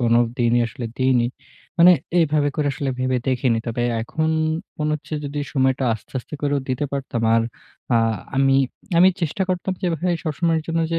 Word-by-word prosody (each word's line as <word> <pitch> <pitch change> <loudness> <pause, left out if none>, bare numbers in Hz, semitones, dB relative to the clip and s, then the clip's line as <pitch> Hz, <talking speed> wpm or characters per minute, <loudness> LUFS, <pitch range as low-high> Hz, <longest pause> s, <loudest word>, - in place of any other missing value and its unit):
কোনোদিনই 120 0 +2
আসলে 120 +2 -7
দিইনি, 130 -2 +3 0.5
মানে 175 +2 +9 0.3
এভাবে 150 -2 +2
করে 150 - 0
আসলে 140 0 -2
ভেবে 130 0 +1
দেখিনি। 125 -2 +1
তবে 115 +1 -2 0.2
এখন 155 +7 -1 0.5
মনে 150 0 0
হচ্ছে 155 +1 -6
যদি 145 +1 -4
সময়টা 130 -1 +2
আস্তে, 110 - -13
আস্তে 125 - -9
করেও 145 -1 +1
দিতে 130 +3 -1
পারতাম 135 -4 -3
আর 115 - +4 0.5
আ - - +6 0.4
আমি 135 0 +4 0.4
আমি 185 - +8
চেষ্টা 170 +3 -1
করতাম 185 +1 -1
যেভাবে 175 -1 0 0.2
সবসময়ের 160 +1 0
জন্য 165 0 0
যে 165 - +1
140 Hz, 165 wpm, -22 LUFS, 125-155 Hz, 0.5 s, মানে